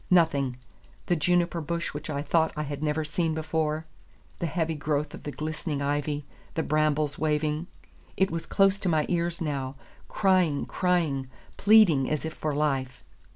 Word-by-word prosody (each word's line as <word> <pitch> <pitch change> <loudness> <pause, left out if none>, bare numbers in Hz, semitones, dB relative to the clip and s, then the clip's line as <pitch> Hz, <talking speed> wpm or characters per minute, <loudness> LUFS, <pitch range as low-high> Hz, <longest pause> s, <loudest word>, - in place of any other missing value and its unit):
Nothing, 145 -8 +3 0.5
the 175 - +2
juniper 175 +1 +1
bush 170 +2 -3
which 150 +2 -6
I 145 -1 -2
thought 160 +1 +2
I 150 - 0
had 145 -1 -5
never 155 0 0
seen 160 +1 -1
before, 160 0 -1 0.5
the 170 - -1
heavy 165 0 -1
growth 150 0 -1
of - - -8
the 145 - -5
glistening 155 0 -3
ivy, 145 +1 -1 0.3
the 160 - 0
brambles 155 -1 +1
waving. 155 +1 0 0.5
It 190 -2 +2
was 165 0 -4
close 195 0 +3
to 190 - -1
my 155 -2 +2
ears 170 -1 -1
now, 140 -4 -2 0.3
crying, 185 -7 +2
crying, 160 -8 0 0.3
pleading 200 -11 +5
as 155 0 -1
if 160 - -4
for 155 -3 -2
life. 135 -3 -1
155 Hz, 160 wpm, -27 LUFS, 145-170 Hz, 0.5 s, pleading